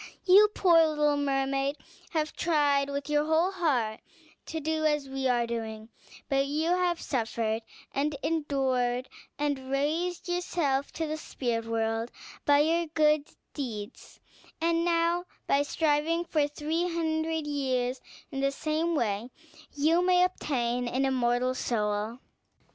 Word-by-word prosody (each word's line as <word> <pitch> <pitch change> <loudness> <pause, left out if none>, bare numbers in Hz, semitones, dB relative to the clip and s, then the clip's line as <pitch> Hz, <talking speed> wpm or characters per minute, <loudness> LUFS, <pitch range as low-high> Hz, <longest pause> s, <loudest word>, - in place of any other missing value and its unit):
You, 400 +3 +7
poor 340 -3 +6
little 300 -1 +2
mermaid, 275 0 0 0.3
have 310 -2 -2
tried 290 -4 +2
with 280 0 -3
your 295 0 +2
whole 320 +4 +2
heart 265 - 0 0.5
to 320 - -3
do 315 +1 -1
as 295 -2 +1
we 265 0 -2
are 240 -2 +2
doing; 225 -1 -5 0.4
you 280 +4 +1
have 360 -1 +1
suffered 225 -3 -1 0.3
and 285 +2 0
endured 265 -5 0 0.3
and 280 -3 -2
raised 325 +6 -1
yourself 335 -6 0
to 325 - -2
the 310 0 -3
spirit 240 -6 -3
world 225 0 -1 0.4
by 285 0 +5
your 335 +2 +2
good 305 -1 +2 0.3
deeds; 220 -8 -7 0.4
and 335 0 +1
now, 340 +1 +1 0.2
by 280 - +3
striving 315 +3 +1
for 300 -3 +1
three 320 +4 -2
hundred 320 -1 -1
years 260 -3 -1 0.3
in 270 - -4
the 275 - +3
same 315 +4 -1
way, 220 -3 -1 0.4
you 320 +5 +2
may 360 0 +4
obtain 250 -9 -1
an 260 +3 0
immortal 250 -1 +1
soul." 215 -2 -1
290 Hz, 130 wpm, -28 LUFS, 255-320 Hz, 0.5 s, You